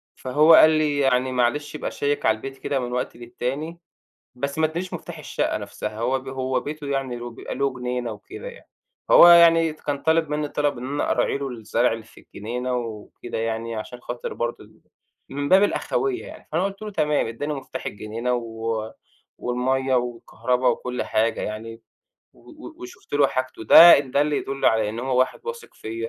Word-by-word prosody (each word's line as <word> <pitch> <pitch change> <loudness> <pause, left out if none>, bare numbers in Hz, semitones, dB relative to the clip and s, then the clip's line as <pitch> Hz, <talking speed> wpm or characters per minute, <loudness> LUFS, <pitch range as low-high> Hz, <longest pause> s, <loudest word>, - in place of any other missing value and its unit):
فهو 150 +5 +4
قال 155 - +9
لي: 155 -2 +1
"يعني 130 -1 +2
معلش 130 +5 0
ابقى - - -4
شيّك 145 0 -1
على 110 - +4
البيت 135 +4 -8
كده 135 +1 -2
من 125 -1 -4
وقت 125 0 -3
للتاني." 135 +7 -5 0.6
بس 140 +3 -4
ما 160 - +3
ادانيش 170 +4 -4
مُفتاح - - -7
الشقّة - - -2
نَفْسها 110 - -6
هو 130 +3 0
ب 130 - -15
هو 130 0 -1
بيته 150 0 -7
يعني 135 -3 -3
ويبقى 120 -1 -7
له 140 -1 0
جنينة 125 -1 -3
وكده 415 - -9
يعني، - - -12 0.4
فهو - - +9
يعني 165 -2 +7
ت 155 - -21
كان 145 -1 -2
طالب 160 -1 +2
منّي 150 0 -1
الطلب 145 -1 -1
إن 125 - -6
أنا 145 +2 -1
أراعي - - +1
له 140 -1 -4
الزرع 115 0 0
اللي 115 0 -7
في - - -18
الجنينة 125 +4 -5
وكده 115 0 -7
يعني، 115 0 -3
عشان 110 +3 -7
خاطر 120 0 -6
برضه 120 0 -4
ال - - -21 0.5
من 145 +1 -3
باب 190 +2 +6
الأخوية 370 - -1
يعني، 315 - -12
فأنا 165 +4 +1
قُلت 195 +1 -4
له: 215 -1 -6
"تمام." 150 - +1
اداني 145 +7 -4
مُفتاح 135 -2 -7
الجنينة 115 +4 -3
و 115 -2 -3 0.5
والمَيّة 130 +2 0
والكهربا 125 +1 -1
وكل 125 +1 -1
حاجة 115 +1 0
يعني 115 +2 -6 0.5
و - - -18
و 315 0 -11
وشُفت 365 +2 -12
له 145 -1 +5
حاجته. 130 -4 -4
ده 170 +10 +10
إن 135 -2 -4
دل 145 +3 +1
يدُل 135 -1 -3
على 110 -1 +3
إن 110 +2 -5
هو 130 0 0
واحد 130 - +1
واثق 475 -1 -7
فيَّ، 115 +1 -5
130 Hz, 190 wpm, -23 LUFS, 120-150 Hz, 0.6 s, ده